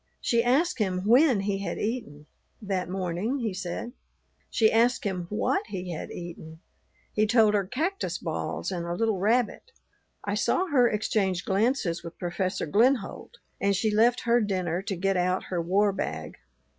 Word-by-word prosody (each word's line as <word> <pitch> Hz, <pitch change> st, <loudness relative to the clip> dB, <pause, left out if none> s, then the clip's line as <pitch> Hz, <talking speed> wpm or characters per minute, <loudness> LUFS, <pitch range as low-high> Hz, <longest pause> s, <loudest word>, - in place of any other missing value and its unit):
She 235 Hz, -2 st, +2 dB
asked 285 Hz, +7 st, +2 dB
him 185 Hz, -3 st, 0 dB
when 245 Hz, -1 st, +5 dB
he 195 Hz, 0 st, -1 dB
had 200 Hz, -, -3 dB
eaten. 210 Hz, -11 st, -4 dB, 0.3 s
That 195 Hz, -4 st, -2 dB
morning, 185 Hz, +7 st, -2 dB
he 220 Hz, -4 st, -1 dB
said. 185 Hz, +5 st, -5 dB, 0.6 s
She 220 Hz, -1 st, +3 dB
asked 235 Hz, +3 st, +3 dB
him 180 Hz, -4 st, -3 dB
what 390 Hz, -, 0 dB
he 180 Hz, -2 st, -5 dB
had 160 Hz, -, -5 dB
eaten; 165 Hz, -2 st, -8 dB, 0.5 s
he 215 Hz, 0 st, +2 dB
told 220 Hz, -2 st, +4 dB
her 200 Hz, -2 st, +1 dB
cactus 335 Hz, -, -2 dB
balls -, -, -3 dB
and 170 Hz, -2 st, -3 dB
a 170 Hz, -, -2 dB
little 220 Hz, -1 st, 0 dB
rabbit. 230 Hz, -, +1 dB, 0.6 s
I -, -, -1 dB
saw 370 Hz, -, +1 dB
her 250 Hz, -5 st, +4 dB
exchange 200 Hz, -4 st, 0 dB
glances 195 Hz, -4 st, 0 dB
with 170 Hz, 0 st, -9 dB
Professor 185 Hz, +1 st, -2 dB
Glenholdt, 235 Hz, -, +1 dB, 0.2 s
and 200 Hz, 0 st, +2 dB
she 215 Hz, +3 st, +1 dB
left 230 Hz, +3 st, +4 dB
her 235 Hz, 0 st, +3 dB
dinner 185 Hz, -4 st, -1 dB
to 195 Hz, 0 st, -3 dB
get 195 Hz, +2 st, 0 dB
out 180 Hz, +1 st, +1 dB
her 175 Hz, -, +1 dB
war 200 Hz, +4 st, +2 dB
bag. 80 Hz, -, -5 dB
200 Hz, 165 wpm, -27 LUFS, 180-235 Hz, 0.6 s, when